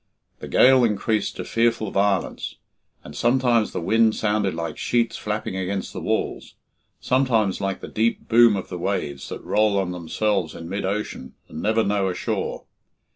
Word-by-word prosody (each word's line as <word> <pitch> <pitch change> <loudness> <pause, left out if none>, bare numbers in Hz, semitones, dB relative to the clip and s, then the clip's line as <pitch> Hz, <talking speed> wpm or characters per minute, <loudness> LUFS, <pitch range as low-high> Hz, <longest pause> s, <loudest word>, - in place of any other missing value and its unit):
The - - -7
gale 130 0 +5
increased 110 -1 0
to - - -5
fearful 115 -3 +1
violence, 100 -1 0 0.5
and 75 - -11
sometimes 120 - +2
the - - -3
wind 110 +5 +3
sounded 105 -4 0
like 85 -2 -4
sheets 120 -1 0
flapping 105 -2 -3
against 95 +1 -3
the - - -6
walls, - - -2 0.4
sometimes 120 -7 +1
like 95 0 -2
the - - -7
deep 115 +2 -1
boom 115 -2 +6
of 95 - -5
the 90 - -5
waves 70 -4 -3
that - - -7
roll 105 -1 +2
on 95 -2 0
themselves 90 0 -1
in 85 - -8
mid 95 +2 -3
ocean 100 -9 -4
and 80 - -7
never 110 +1 +2
know 100 -2 +1
a 90 - -3
shore. - - -3
105 Hz, 170 wpm, -23 LUFS, 95-115 Hz, 0.5 s, boom